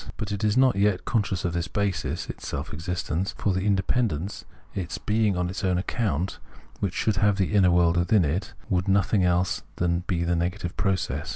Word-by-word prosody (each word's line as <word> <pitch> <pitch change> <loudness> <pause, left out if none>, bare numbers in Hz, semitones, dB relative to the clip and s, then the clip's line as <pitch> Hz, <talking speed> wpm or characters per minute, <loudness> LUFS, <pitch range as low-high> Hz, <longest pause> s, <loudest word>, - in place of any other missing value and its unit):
But 105 -2 -4
it 100 +1 -3
is 105 +2 +2
not 130 -5 +4
yet 100 -2 +2
con 115 - +2
scious 95 -3 -3
of 90 - -1
this 85 -1 -1
basis 100 +2 -2
[its - - -7
self 70 +3 -4
existence], 85 +3 -2
for 100 - +1
the 95 - 0
independ 105 +4 +2
ence, 85 +8 -5 0.3
its 90 -3 -4
being 105 -3 +1
on 90 0 0
its 95 +4 -5
own 90 -2 +2
account, 95 - -1 0.4
v/hich 95 -2 -2
should 110 -3 +1
have 105 +1 +3
the 95 +1 0
inner 95 -3 +5
world 85 -1 +3
within 85 +2 +3
it, 90 +7 -2
would 90 -1 +1
be 95 - +4
nothing 100 0 +2
else 90 0 +1
than 85 0 0
the 85 -1 0
negative 90 +1 -2
process. 85 -5 -1
95 Hz, 205 wpm, -26 LUFS, 85-100 Hz, 0.4 s, inner